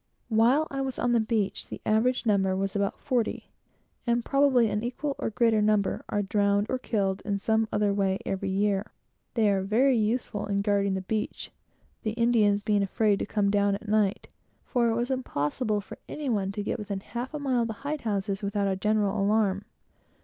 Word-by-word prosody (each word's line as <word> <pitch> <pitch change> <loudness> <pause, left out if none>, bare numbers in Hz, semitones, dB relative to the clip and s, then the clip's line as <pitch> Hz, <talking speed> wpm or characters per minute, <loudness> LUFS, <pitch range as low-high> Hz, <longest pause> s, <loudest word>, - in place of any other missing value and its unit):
While 245 +8 +3
I 275 0 -2
was 265 -1 -3
on 245 - +1
the 235 - +4
beach, 220 -3 -1
the - - -7
average 245 +4 +2
number 195 -3 +2
was 195 +1 -2
about 200 -1 0
forty, 245 -5 -2 0.6
and 235 0 +1
probably 275 -4 +4
an 210 0 -2
equal, 275 +4 -3
or - - -1
greater 225 0 +2
number 210 -1 +1
are 205 - 0
drowned, 200 +1 +2
or 260 - 0
killed 195 -6 -1
in 200 -1 -1
some 220 +2 +1
other 205 -1 +1
way, 195 -1 +1
every 195 0 -2
year. 200 +1 0 0.4
They 225 -3 +3
are 195 -1 +2
very 240 +7 +3
useful 220 -1 -1
in 200 0 0
guarding 200 -1 +1
the 190 - -2
beach, 210 +3 -3 0.5
the 215 -2 -2
Indians 220 -3 +3
being 210 -1 +2
afraid 205 +1 +1
to - - -3
come 205 -2 +1
down 200 -1 +2
at 210 +2 -9
night; 210 -2 +1 0.4
for 240 -3 +1
it 225 - +1
was 240 +3 -1
impossible 215 - -1
for - - -11
any 295 -3 -4
one 200 -4 0
to 205 0 -3
get 220 - -2
within 200 -2 -4
half 240 +5 -5
a 305 - -4
mile 265 -4 0
of 230 - 0
the 225 - -4
hide 300 0 -2
houses 200 -2 -2
without 200 0 -1
a 190 - 0
general 210 0 +1
alarm. 205 -1 +1
210 Hz, 200 wpm, -27 LUFS, 200-235 Hz, 0.6 s, the